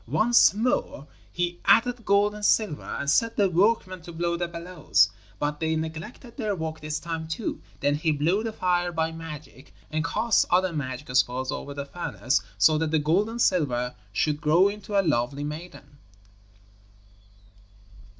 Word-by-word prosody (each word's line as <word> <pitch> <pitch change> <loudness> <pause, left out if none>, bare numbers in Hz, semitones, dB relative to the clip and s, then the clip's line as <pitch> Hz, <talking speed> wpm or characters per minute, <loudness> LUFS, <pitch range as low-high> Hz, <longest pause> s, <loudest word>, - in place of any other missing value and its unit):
Once 235 +2 +5
more 220 - -1 0.3
he 175 0 -2
added 240 +1 +4
gold 200 +1 +3
and 210 0 -9
silver 205 -7 +2 0.2
and - - -4
set 230 +10 +2
the 200 - +4
workmen 185 0 +1
to 170 - -10
blow 170 +1 -1
the 175 0 -2
bellows, 170 - +1 0.3
but 150 0 -2
they 160 0 0
neglected 160 +10 -6
their 215 -5 -1
work 160 -2 -4
this 155 0 -3
time 165 -1 -5
too. 165 +7 -4 0.2
Then 145 0 +2
he 155 +2 0
blew 165 +8 +1
the 225 - -2
fire 175 -3 0
by 160 -1 -1
magic, 150 -6 -10 0.2
and 155 +1 -1
cast 220 +6 +2
other 180 0 +2
magic 130 -3 -5
spells 130 +1 +1
over 140 -1 -6
the 140 0 -4
furnace, 140 -4 -1 0.2
so 155 +9 +4
that 160 -1 0
the 160 - +2
gold 165 +8 +1
and 235 +1 -6
silver 125 - +1 0.2
should 150 +8 0
grow 170 +6 +4
into 205 0 -2
a 195 - +1
lovely 140 -1 0
maiden. 150 -1 -8
165 Hz, 165 wpm, -26 LUFS, 150-195 Hz, 0.3 s, Once